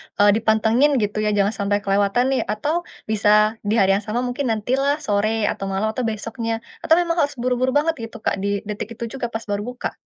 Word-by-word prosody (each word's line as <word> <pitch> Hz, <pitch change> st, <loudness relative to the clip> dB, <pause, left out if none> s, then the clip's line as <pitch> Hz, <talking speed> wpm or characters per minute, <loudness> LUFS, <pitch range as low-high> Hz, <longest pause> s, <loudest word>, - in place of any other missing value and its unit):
eee, 205 Hz, 0 st, +5 dB
dipantengin, 225 Hz, +6 st, +3 dB
gitu 210 Hz, +1 st, -2 dB
ya? 210 Hz, -1 st, +1 dB
Jangan 200 Hz, 0 st, +2 dB
sampai 200 Hz, 0 st, +1 dB
kelewatan 200 Hz, +4 st, +2 dB
nih, 265 Hz, -, +1 dB
atau 300 Hz, +12 st, -2 dB, 0.2 s
bisa 215 Hz, +1 st, +3 dB
di 210 Hz, -, +2 dB
hari 195 Hz, -4 st, +4 dB
yang 200 Hz, +2 st, +1 dB
sama, 235 Hz, +4 st, -1 dB
mungkin 250 Hz, +2 st, -2 dB
nanti 220 Hz, 0 st, -1 dB
lah, 280 Hz, +1 st, +2 dB
sore 215 Hz, 0 st, 0 dB
atau 195 Hz, -, -5 dB
malam 195 Hz, +3 st, -1 dB
atau 250 Hz, +3 st, -3 dB
besoknya 225 Hz, +1 st, -3 dB, 0.3 s
atau 320 Hz, -, +5 dB
memang 340 Hz, 0 st, 0 dB
harus 290 Hz, -2 st, +1 dB
buru-buru 250 Hz, +1 st, 0 dB
banget, 320 Hz, +3 st, +2 dB
gitu, 225 Hz, -, -11 dB
Kak, -, -, +1 dB
di 200 Hz, 0 st, -1 dB
detik 210 Hz, +2 st, -5 dB
itu 235 Hz, -, -7 dB, 0.2 s
juga 240 Hz, -, -1 dB
pas 230 Hz, -1 st, -5 dB
baru 205 Hz, -2 st, -2 dB
buka? 250 Hz, 0 st, -4 dB
220 Hz, 215 wpm, -21 LUFS, 205-250 Hz, 0.3 s, eee